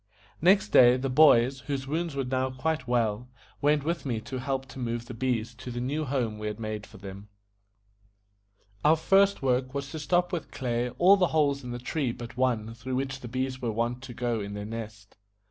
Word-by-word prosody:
Next 180 - +4
day, 120 +3 +7
the 130 0 -2
boys, 130 -2 +5
whose 135 -2 -2
wounds 160 +2 -2
were 135 - 0
now 130 +1 -1
quite 130 +1 -2
well, 120 -1 0 0.3
went 145 0 +3
with 170 +3 -2
me 120 -5 -2
to 130 +3 -6
help 135 0 -2
to 130 - -9
move 120 -1 -3
the 125 - -8
bees 120 -1 -1
to 125 - -9
the 120 0 -4
new 145 +5 -2
home 120 -6 -2
we 105 - -4
had 105 0 -4
made 110 -2 -5
for - - -14
them. 100 +1 -9 1.6
Our 155 +2 +6
first 195 +2 +3
work 130 +1 0
was 140 -1 -4
to 160 - -5
stop 175 +4 +1
with 170 - -3
clay 120 -1 -2
all 190 +7 +6
the 180 -2 +3
holes 140 -2 +2
in 125 - -7
the 120 - -4
tree 130 +1 -2
but 120 0 -9
one 115 -3 0
through 125 +3 -5
which 135 0 -2
the 125 - -8
bees 130 +2 -3
were 120 -2 -1
wont 120 +3 -2
to 130 -2 -8
go 120 -1 -1
in 100 0 -5
to - - -6
their 105 0 -5
nest. 110 -2 -8
130 Hz, 215 wpm, -28 LUFS, 115-140 Hz, 1.6 s, day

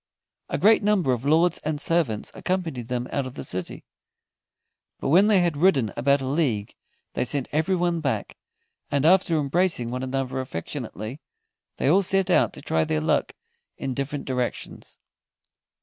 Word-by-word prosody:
A - - -1
great 220 +2 +5
number 200 -10 +2
of 125 +2 -4
lords 165 +4 +3
and 150 -1 -3
servants 150 -11 0
accompanied 165 -11 -3
them 125 0 -2
out 140 -2 -1
of 130 - -10
the - - -6
city, 95 -8 -4 1.2
but - - -2
when 185 +7 +6
they 205 -4 +4
had 170 -3 +1
ridden 145 - +3
about 140 +1 +2
a - - -3
league 130 -8 -1 0.4
they - - 0
sent 135 +1 -2
everyone 175 +2 +1
back, 130 -9 -2 0.5
and 140 0 0
after 175 -1 +4
embracing 150 -4 +1
one 125 +1 -3
another 130 0 -2
affectionately, 110 - -6 0.5
they - - -1
all 180 +7 +5
set 195 0 +1
out - - +4
to - - -11
try 80 0 +1
their 80 -1 0
luck 75 - 0 0.4
in 135 - -3
different 140 +2 -4
directions. 125 -2 -4
140 Hz, 160 wpm, -25 LUFS, 125-175 Hz, 1.2 s, when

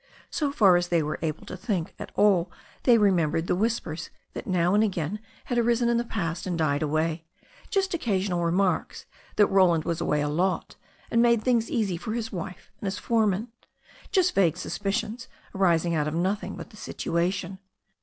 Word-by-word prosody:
So 295 -3 0
far 195 -10 +5
as 175 0 -1
they 170 -2 +2
were 150 +1 -3
able 160 -1 -3
to - - -7
think 185 -3 -2
at - - -7
all 195 -4 +3 0.3
they 240 -3 +7
remembered 170 -6 +2
the - - +1
whis 225 +5 +1
pers 160 0 -7 0.2
that - - -7
now 180 -1 +2
and 210 +1 +4
again 190 -1 -2 0.3
had 245 -1 0
arisen 235 0 +2
in 235 - +2
the 235 - +1
past 180 -7 -3
and 175 -2 -1
died 150 -2 +1
away 155 +2 0 0.2
— - - -25
just 385 -2 0
occasional 195 - 0
remarks 180 +2 0 0.3
that 210 - +6
Roland 185 -5 +4
was 170 -1 -2
away 150 - +1
a 145 - 0
lot 180 +5 -1 0.4
and 230 - +4
made 235 -2 +4
things 235 -3 +2
easy 205 -7 0
for 215 +6 -5
his 225 -1 -3
wife 185 -1 -7
and 200 - -4
his 190 - -2
foreman, 220 -1 +1 0.6
just 370 -2 +3
vague 175 -4 +3
suspicions 220 +6 -3 0.3
arising 175 -3 +2
out 150 -2 +1
of 155 - -2
nothing 190 +5 -1
but - - -9
the 215 - -15
situation. 180 +1 -2
190 Hz, 190 wpm, -26 LUFS, 170-220 Hz, 0.6 s, they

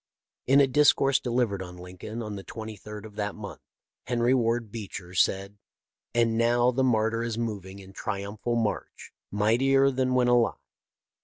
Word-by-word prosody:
In 135 +2 +6
a 140 - +7
discourse 135 0 +4
delivered 120 -6 0
on 90 -1 -8
Lincoln 90 +6 -7
on 105 -1 -5
the 100 - -7
23d 105 -1 -8
of 105 -1 -12
that 105 -1 -2
month, 100 -3 -8 0.5
Henry 120 +1 +2
Ward 115 -3 +1
Beecher 100 -5 -7
said: 100 +3 +1 0.6
"And 115 -1 +2
now 120 +1 +3
the 130 +2 0
martyr 115 -2 +2
is 115 -1 -3
moving 100 -5 -4
in 95 -1 -13
triumphal 105 +4 -3
march, 110 -3 -3 0.2
mightier 135 +7 +3
than 130 -1 0
when 125 -1 +3
alive. 120 -1 +3
115 Hz, 155 wpm, -27 LUFS, 100-120 Hz, 0.6 s, a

